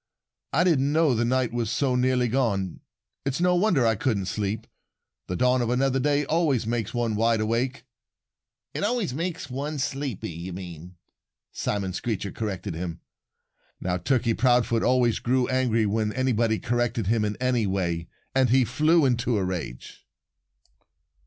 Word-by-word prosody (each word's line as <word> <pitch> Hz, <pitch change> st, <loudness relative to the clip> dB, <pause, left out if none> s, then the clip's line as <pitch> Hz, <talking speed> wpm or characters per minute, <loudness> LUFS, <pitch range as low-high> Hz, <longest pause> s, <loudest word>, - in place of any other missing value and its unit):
"I 165 Hz, -, +3 dB
didn't 145 Hz, -6 st, +2 dB
know 155 Hz, -3 st, +3 dB
the 120 Hz, 0 st, +1 dB
night 125 Hz, -1 st, +1 dB
was 120 Hz, -2 st, -1 dB
so 135 Hz, +1 st, +1 dB
nearly 125 Hz, 0 st, +2 dB
gone. 110 Hz, -7 st, 0 dB, 0.4 s
It's 135 Hz, +1 st, -2 dB
no 180 Hz, +1 st, +3 dB
wonder 175 Hz, -, +3 dB
I 115 Hz, -, +4 dB
couldn't 105 Hz, -3 st, -1 dB
sleep. 100 Hz, +3 st, -2 dB, 0.6 s
The 90 Hz, -, -3 dB
dawn 125 Hz, +5 st, +3 dB
of 120 Hz, -, -1 dB
another 135 Hz, +2 st, +1 dB
day 145 Hz, +2 st, +1 dB
always 150 Hz, -7 st, +1 dB
makes 115 Hz, -2 st, -2 dB
one 120 Hz, -3 st, -1 dB
wide 115 Hz, +1 st, +2 dB
awake." 115 Hz, +5 st, -1 dB, 0.9 s
"It -, -, -3 dB
always 215 Hz, -, 0 dB
makes 165 Hz, +2 st, -3 dB
one 145 Hz, +4 st, -3 dB
sleepy, 135 Hz, -7 st, -3 dB
you 85 Hz, +3 st, -7 dB
mean," 90 Hz, -1 st, -9 dB, 0.6 s
Simon 100 Hz, -3 st, -2 dB
Screecher 100 Hz, -1 st, -3 dB
corrected 100 Hz, -3 st, -4 dB
him. 85 Hz, 0 st, -5 dB, 0.8 s
Now, 90 Hz, 0 st, -1 dB
Turkey 115 Hz, +4 st, +1 dB
Proudfoot 120 Hz, -2 st, +2 dB
always 125 Hz, -2 st, +2 dB
grew 125 Hz, +1 st, +1 dB
angry 125 Hz, -4 st, +2 dB
when 105 Hz, +1 st, 0 dB
anybody 120 Hz, -4 st, +1 dB
corrected 120 Hz, -1 st, -1 dB
him 110 Hz, +2 st, +1 dB
in 105 Hz, 0 st, -1 dB
any 125 Hz, -4 st, 0 dB
way. 85 Hz, -3 st, -1 dB, 0.3 s
And 130 Hz, -2 st, +3 dB
he 130 Hz, +1 st, +4 dB
flew 155 Hz, +6 st, +3 dB
into 120 Hz, -2 st, +1 dB
a 100 Hz, -, 0 dB
rage. 85 Hz, -10 st, -6 dB
120 Hz, 155 wpm, -26 LUFS, 105-130 Hz, 0.9 s, I